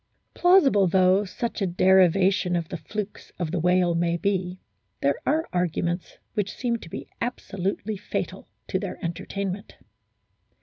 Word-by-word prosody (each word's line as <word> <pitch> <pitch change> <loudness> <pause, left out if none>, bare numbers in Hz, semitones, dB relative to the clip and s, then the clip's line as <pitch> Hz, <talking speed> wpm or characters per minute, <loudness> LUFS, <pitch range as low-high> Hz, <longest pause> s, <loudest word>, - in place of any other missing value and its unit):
Plausible 290 - +5
though 185 +3 +4
such 215 +5 -4
a 195 - +2
derivation 185 +1 +4
of 170 -2 -2
the 175 - -4
flukes 205 +6 -6
of 170 -3 -2
the 180 - 0
whale 180 +1 +3
may 170 0 +1
be, 185 -1 -1 0.4
there 140 0 +1
are 315 +3 +2
arguments 175 0 -1 0.2
which 205 -2 -2
seem 240 -2 -1
to 170 - -12
be - - -7
absolutely 205 -3 -3
fatal 205 - -4 0.2
to 190 - 0
their 195 -2 -5
entertainment. 195 +3 -4
185 Hz, 140 wpm, -25 LUFS, 175-205 Hz, 0.4 s, Plausible